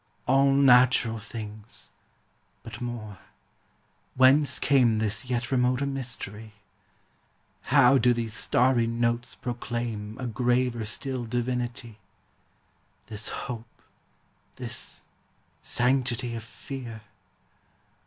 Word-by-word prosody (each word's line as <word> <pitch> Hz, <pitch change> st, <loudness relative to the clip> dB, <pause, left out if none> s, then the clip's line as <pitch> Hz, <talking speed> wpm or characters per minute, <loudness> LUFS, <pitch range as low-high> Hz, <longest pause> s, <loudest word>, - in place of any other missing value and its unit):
All 135 Hz, +2 st, +4 dB
natural 125 Hz, -4 st, +5 dB
things! 110 Hz, -1 st, -7 dB, 0.7 s
But -, -, -9 dB
more 110 Hz, -6 st, -6 dB, 1.0 s
Whence 135 Hz, +1 st, +5 dB
came 125 Hz, -6 st, +3 dB
This 110 Hz, +3 st, 0 dB
yet 120 Hz, 0 st, -2 dB
remoter 125 Hz, +1 st, +2 dB
mystery? 115 Hz, -6 st, -5 dB, 1.1 s
How 135 Hz, -1 st, +5 dB
do 125 Hz, -, +4 dB
these 115 Hz, -2 st, -2 dB
starry 120 Hz, +1 st, +2 dB
notes 120 Hz, 0 st, -1 dB
proclaim 120 Hz, -3 st, -4 dB
A 130 Hz, -, -4 dB
graver 120 Hz, 0 st, 0 dB
still 130 Hz, +2 st, -2 dB
divinity? 120 Hz, -1 st, -3 dB, 1.1 s
This 110 Hz, -1 st, -3 dB
hope, 115 Hz, -3 st, -7 dB, 0.7 s
this -, -, -6 dB, 0.6 s
sanctity 125 Hz, -1 st, +1 dB
of 115 Hz, -1 st, -5 dB
fear? 115 Hz, -1 st, -8 dB
120 Hz, 90 wpm, -27 LUFS, 115-130 Hz, 1.1 s, natural